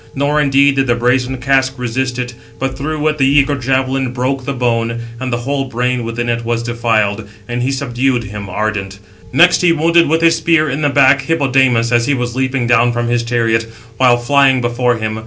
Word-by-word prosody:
Nor 145 +2 +1
indeed 140 -1 +3
did 135 0 +1
the 120 - +2
brazen 125 +2 0
casque 130 +1 0
resist 125 +1 -3
it, 125 -1 -4 0.2
but 135 0 -3
through 155 +2 -3
it 150 -1 -1
the 135 - +3
eager 140 +1 +3
javelin 130 0 -1
broke 130 +1 -2
the 140 - -2
bone, 115 -2 -1 0.2
and 130 -1 -4
the 120 - 0
whole 135 +3 -2
brain 125 0 -2
within 115 0 -3
was 115 0 -2
defiled; 110 -3 -1 0.2
and 120 0 -3
he 130 +2 -1
subdued 130 -2 -1
him, 105 -1 -8
ardent. 100 -1 -3 0.3
Next 175 +1 +4
he 175 -2 +3
wounded 165 0 +2
with 160 +1 +1
his 165 0 +4
spear 165 -2 +2
in 140 +4 -3
the 145 - +2
back, 140 -1 +4
Hippodamas, 130 -6 +1
as 120 -1 +2
he 145 - +1
was 120 -1 -3
leaping 130 -1 -1
down 120 0 +3
from 120 0 -2
his 120 0 +1
chariot, 115 -1 0 0.3
while 125 -1 +4
flying 135 +2 +3
before 120 0 0
him. 110 0 -4
125 Hz, 200 wpm, -15 LUFS, 120-135 Hz, 0.3 s, Next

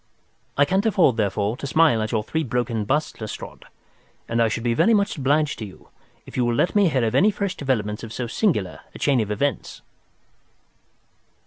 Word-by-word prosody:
I 145 - +5
can't 190 +7 +1
afford, 175 - +3
therefore, 105 0 0
to 140 - -5
smile 155 -6 +3
at 110 - -2
your 110 -2 0
three 160 +8 -2
broken 120 -4 -2
busts, 150 0 -1
Lestrade, 110 - -8 0.6
and 115 +1 0
I 115 - +4
shall 115 +1 -3
be 120 -1 +1
very 225 - +4
much 200 0 +1
obliged 145 +1 +1
to 110 - -4
you 95 - -16 0.4
if - - -12
you 125 - +1
will 120 -1 +1
let 175 - +1
me 200 -4 +4
hear 130 -6 +1
of 110 - -1
any 205 - +5
fresh 200 -2 -2
development 110 -6 -2
of 115 - -8
so 120 +2 -4
singular 115 - -1 0.2
a - - -6
chain 140 -3 +2
of 105 - -3
events." 135 +7 -2
125 Hz, 200 wpm, -23 LUFS, 110-155 Hz, 0.6 s, I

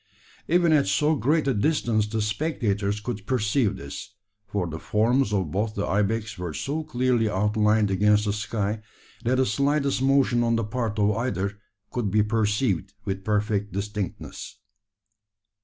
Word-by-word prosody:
Even 170 -1 +4
at 145 -7 +3
so 150 +11 +2
great 150 +3 +1
a 135 - +3
distance 115 -3 +1
the 110 0 -1
spectators 105 -4 -1
could 105 -2 -5
perceive 110 -3 +1
this: 70 +7 -8 0.3
for 100 -2 -1
the 80 -1 -5
forms 115 +4 +1
of 95 -7 0
both 105 +3 -1
the 100 - -1
ibex 105 0 -1
were 85 -4 -4
so 155 +3 -2
clearly 125 -6 +1
outlined 105 +1 +2
against 105 +2 +3
the 100 - 0
sky, 105 0 -2 0.4
that 125 +2 +2
the 130 0 +3
slightest 140 +3 +1
motion 135 -3 +3
on 115 0 +2
the 115 - 0
part 110 -1 -2
of 105 0 +3
either 100 -4 -2 0.3
could 120 -5 -1
be 105 +2 +3
perceived 105 -2 0
with 95 -1 -3
perfect 105 -1 0
distinctness. 100 -1 -5
105 Hz, 155 wpm, -25 LUFS, 100-125 Hz, 0.4 s, Even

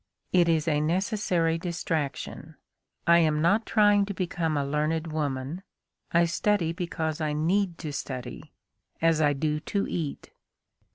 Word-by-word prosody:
It 175 -2 +4
is 160 -1 +1
a 150 -2 +2
necessary 175 -1 0
distraction. 160 -3 -3 0.5
I 170 0 +6
am 155 -2 +2
not 200 +8 +2
trying 205 -2 +4
to 200 - -4
become 170 -4 -1
a 140 - 0
learned 155 +3 -1
woman; 145 +2 -2 0.5
I 170 +1 +4
study 170 0 +1
because 165 -2 -3
I 150 -1 0
need 175 +4 +1
to 155 -3 -6
study, 130 +2 -6 0.5
as 165 -1 +3
I 145 -1 +4
do 150 +2 -1
to 200 +5 -2
eat." 155 -5 -4
165 Hz, 140 wpm, -27 LUFS, 150-175 Hz, 0.5 s, I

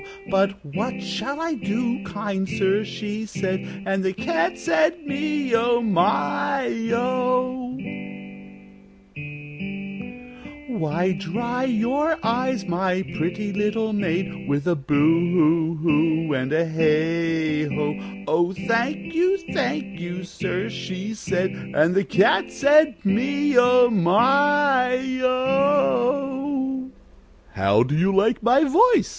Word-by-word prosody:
'But 195 +1 +1
what 210 - -4
shall 205 +10 -4
I 330 0 -2
do, 235 -1 -2
kind 195 0 -3
sir?' 195 +2 +1
she 210 +1 -5
said, 190 -1 -4
And 195 0 -1
the 190 0 0
Cat 330 - -1
said, 330 -1 +1
'Me 285 -2 -2
oh! 235 +1 +3
my 220 +7 +1 0.2
oh!' 255 +1 -1 2.9
'Why, 175 -4 -1
dry 235 +8 -3
your 265 +7 0
eyes, 240 -2 0
my 185 +1 -1
pretty 185 +5 -3
little 210 +2 -1
maid, 185 -5 -2
With 145 0 0
a 175 - +2
Boo 145 -1 -2
hoo 165 +1 +3
hoo 160 0 +1
and 130 0 -2
a 160 +2 +2
Heigho.' 160 +3 -1
'Oh, 175 +3 +1
thank 230 +7 -2
you, 365 +4 +2 0.2
thank 220 -8 -2
you, 175 +1 -6
sir,' 185 +1 -4
she 190 +4 -5
said, 185 -2 -2 0.2
And 165 +3 +3
the 195 +1 +2
Cat 195 0 +2
said, 295 +1 +4
'Me 280 +8 +1
oh! 245 0 +6
my 250 +6 +3 0.3
oh!'" 265 0 +1 0.6
"How 100 +2 +3
do 135 +4 -2
you 180 +5 +2
like 220 +5 +2
my 250 +6 +4
voice?" 425 - +4
205 Hz, 115 wpm, -23 LUFS, 175-255 Hz, 2.9 s, oh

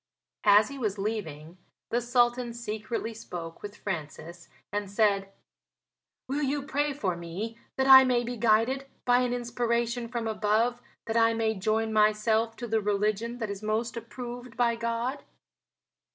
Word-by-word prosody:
As 205 +2 +7
he 280 0 -8
was 215 -4 -1
leaving 185 -6 -4 0.3
the 240 - +1
Sultan 240 0 +1
secretly 225 0 -4
spoke 170 -6 -8
with 205 0 -8
Francis 170 -1 -6 0.2
and 205 -1 -2
said: 200 -1 +1 1.0
"Will 280 +3 -1
you 285 0 0
pray 290 +1 0
for 200 -11 -2
me 185 +7 -6 0.2
that 265 - +2
I 265 0 +10
may 250 -2 +2
be 245 +1 -4
guided 235 +4 +2 0.2
by 245 0 +5
an 250 -1 0
inspiration 235 0 -1
from 235 -1 -3
above 220 +3 +1 0.2
that 225 0 -1
I 230 0 +4
may 225 -1 +1
join 220 +2 0
myself 215 +1 +2
to 240 - -6
the 220 -1 +1
religion 210 +3 0
that 225 -4 -3
is 200 0 -6
most 220 +3 -1
approved 240 +1 -8
by 235 -1 +3
God?" 235 +4 -2
225 Hz, 150 wpm, -28 LUFS, 210-240 Hz, 1.0 s, I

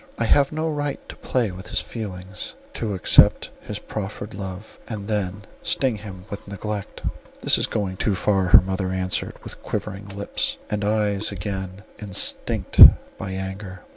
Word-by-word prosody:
I 115 - 0
have 140 +4 +4
no 155 +1 -1
right 145 -2 -3
to - - -7
play 120 -6 -1
with 95 +2 -9
his - - -1
feelings, 95 -4 -6 0.2
to 105 -3 -2
accept 90 - +5
his - - -6
proffered 105 +1 -6
love, 95 +1 -8
and 105 -3 -6
then 100 -2 -2 0.2
sting 130 -5 0
him 95 -3 -9
with 100 -1 -8
neglect." 100 0 -5 0.4
"This - - +4
is - - +2
going 95 -4 -2
too 100 0 +1
far," 95 -1 +2
her - - +9
mother 95 0 -2
answered, 95 0 -1
with - - -8
quivering 100 +2 -4
lips, 100 +1 -2
and 105 -1 -1
eyes 105 -1 +1
again 95 0 -5 0.2
instinct 100 -3 0 0.4
by 95 - -4
anger. 95 -1 -6
100 Hz, 160 wpm, -23 LUFS, 95-105 Hz, 0.4 s, her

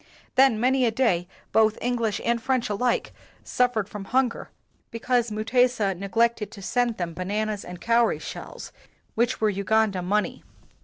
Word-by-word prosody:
Then 260 -4 +4
many 260 +2 +2
a - - +3
day 220 -7 +1 0.2
both 220 -1 +3
English 235 -3 -1
and 235 0 +1
French 255 -2 0
alike 240 +4 0 0.3
suffered 245 -5 0
from 205 -1 -8
hunger 250 +2 0 0.4
be 230 - -6
cause 240 0 +1
Mutesa 220 -1 +1
neglected 210 +3 0
to 200 - -10
send 240 +1 0
them 175 -2 -3
ba 185 - -5
nanas 210 +1 -2
and 180 0 -9
cowry 235 +2 +2
shells, - - -8 0.4
which 240 +2 0
were 215 -2 +2
Uganda 200 0 +1
money. 205 +4 -1
225 Hz, 155 wpm, -25 LUFS, 205-245 Hz, 0.4 s, Then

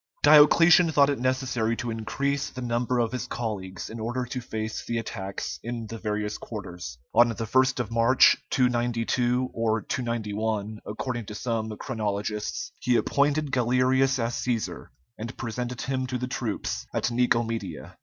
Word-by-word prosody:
Diocletian 160 +3 +7
thought 145 -1 +5
it 140 - -2
necessary 130 -3 0
to 120 0 -3
increase 135 +6 -2
the 130 - -8
number 120 +1 0
of 115 -2 +1
his 125 -3 -4
colleagues 95 -6 -4
in 115 - -7
order 120 +3 -2
to 125 +1 -5
face 110 -2 -4
the 115 - -2
attacks 95 - -4
in 120 -1 -4
the 115 +1 -7
various 105 -1 -2
quarters. 90 - -7 0.2
On 120 +2 +6
the 115 - -3
1st 130 +4 +2
of 115 -3 -2
March, 115 +3 +6
292, 120 0 +1
or 115 -1 0
291, 110 -3 -2
according 120 +2 -3
to 105 - -7
some 110 -2 -2
chronologists, 105 - -3
he 125 - +2
appointed 145 +3 +1
Galerius 130 +2 +3
as 115 -1 -1
Cæsar, 120 -3 -2 0.3
and 115 +3 -6
presented 120 +1 -4
him 130 -1 -2
to 125 0 -2
the 125 - -3
troops 120 -4 -3
at - - 0
Nicomedia. 115 -7 -1
120 Hz, 155 wpm, -26 LUFS, 110-130 Hz, 0.3 s, Diocletian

